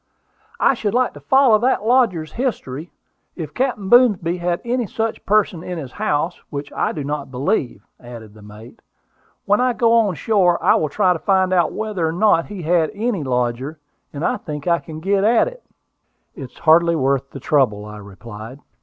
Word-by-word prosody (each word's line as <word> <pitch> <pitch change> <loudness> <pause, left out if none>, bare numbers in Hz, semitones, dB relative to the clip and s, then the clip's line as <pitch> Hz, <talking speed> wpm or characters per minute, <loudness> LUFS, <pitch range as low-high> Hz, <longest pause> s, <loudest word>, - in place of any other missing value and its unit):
"I - - +4
should 215 -3 -2
like 255 0 +1
to - - -11
follow 265 -5 +4
that 240 -2 0
lodger's 220 -11 +2
history, 175 - -4 0.4
if 155 -4 -7
Captain 245 -6 -2
Boomsby 200 -7 +4
had 175 0 -1
any 240 -1 -1
such 225 +3 -3
person 200 -5 +2
in 180 0 -6
his 135 -6 -7
house, 155 +7 -2
which 140 -1 -6
I - - -1
do 150 - -5
not 145 -1 -4
believe," 130 - -2
added 115 -3 -11
the 110 - -16
mate. 105 +3 -13 0.7
"When 205 +3 +2
I 250 -1 +2
go 230 0 +2
on 220 -6 +3
shore 180 -3 +2
I - - +5
will 155 - 0
try 185 +3 +2
to 165 - -5
find 190 0 +1
out 175 -3 +2
whether 210 -6 -2
or 160 - -2
not 180 -2 +2
he 195 -4 -8
had 165 0 +2
any 215 -3 -1
lodger, 125 +3 -2 0.3
and 145 +3 -4
I - - 0
think 150 -1 -7
I 170 -1 +2
can 155 -1 -10
get 195 +2 +1
at 230 - +3
it." - - -9 0.7
"It 140 - -8
is - - -24
hardly 170 +1 +4
worth 135 -2 0
the 135 - -9
trouble," 125 -8 +1
I 105 0 -9
replied. 105 +5 -11
170 Hz, 190 wpm, -20 LUFS, 140-215 Hz, 0.7 s, I